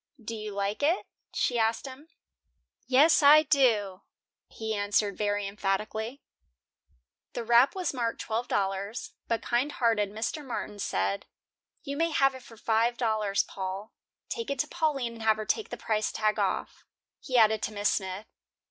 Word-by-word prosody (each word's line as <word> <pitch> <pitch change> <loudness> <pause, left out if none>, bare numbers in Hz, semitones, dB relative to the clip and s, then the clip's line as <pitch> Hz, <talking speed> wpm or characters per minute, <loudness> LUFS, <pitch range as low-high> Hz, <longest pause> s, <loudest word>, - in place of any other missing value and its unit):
"Do 230 0 -6
you 215 -1 -5
like 200 +3 -2
it?" 325 +6 +2 0.3
she 240 -2 0
asked 225 +2 +1
him. 270 +3 -10 0.8
"Yes, 290 +6 +5
I 300 +2 +8
do," 230 -10 +2 0.5
he 220 0 -4
answered 205 -1 +1
very 205 0 -1
emphatically. 210 +5 -3 1.1
The 240 - -3
wrap 240 +6 +5
was 370 -5 -2
marked 235 -3 -2
twelve 230 +2 -2
dollars, 200 +3 -2
but 230 -1 -1
kind 250 +5 0
hearted 225 -4 +1
Mr. 220 +9 -3
Martin 210 -5 -5
said: 100 - -1 0.6
"You 280 0 -4
may 330 +1 +2
have 275 -3 +3
it 260 - -10
for 230 -2 -15
five 230 +2 +1
dollars, 215 -4 +1
Paul. 195 +3 -6 0.3
Take 460 -2 -4
it 280 - -1
to 300 - -4
Pauline 290 -8 -1
and 230 - -11
have 220 -1 +3
her 215 - -4
take 440 - -1
the - - -6
price 215 -1 -1
tag 215 -1 0
off," - - -2 0.4
he 255 -2 -1
added 220 -1 +5
to - - -2
Miss 205 -1 +1
Smith. 190 +1 -2
225 Hz, 165 wpm, -28 LUFS, 205-260 Hz, 1.1 s, I